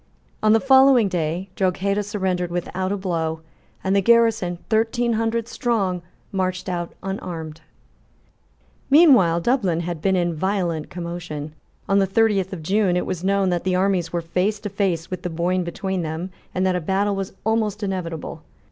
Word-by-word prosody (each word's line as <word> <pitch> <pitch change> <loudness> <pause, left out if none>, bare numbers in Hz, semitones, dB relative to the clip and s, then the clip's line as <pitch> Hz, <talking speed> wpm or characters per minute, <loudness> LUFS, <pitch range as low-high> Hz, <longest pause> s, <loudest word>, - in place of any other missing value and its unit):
On 215 - +4
the 225 - +5
following 265 -3 +6
day, 175 +1 -2
Drogheda 195 +2 0
surrendered 190 -4 -2
without 180 +2 -3
a 205 - 0
blow, 165 -4 -2 0.4
and 190 +1 +1
the 200 - +4
garrison, 225 -5 +3
thirteen 230 +2 +1
hundred 225 +1 0
strong, 200 -8 -1 0.3
marched 185 -1 -2
out 175 -2 -3
unarmed, 165 -5 -5 1.3
Meanwhile 255 - +6
Dublin 190 -7 +1
had 170 -2 -4
been 190 +1 +2
in 175 -2 +1
violent 175 -2 -1
commotion. 170 -4 -6 0.3
On 200 0 +3
the 195 - +2
thirtieth 195 -2 +2
of 175 -5 -6
June 190 +1 +2
it - - -1
was 180 -1 -4
known 195 -1 +2
that 175 -1 -1
the 185 -1 +1
armies 185 -3 +1
were 170 - -1
face 185 +5 -1
to 205 - -4
face 185 -4 -1
with 185 -1 -4
the 180 - -3
Boyne 175 +2 0
between 190 +2 -3
them, 165 +3 -4 0.2
and 185 +1 +1
that 185 -1 +2
a 180 - -1
battle 195 +4 0
was 195 0 -4
almost 215 -2 0
inevitable. 180 -5 -4
185 Hz, 165 wpm, -22 LUFS, 175-205 Hz, 1.3 s, following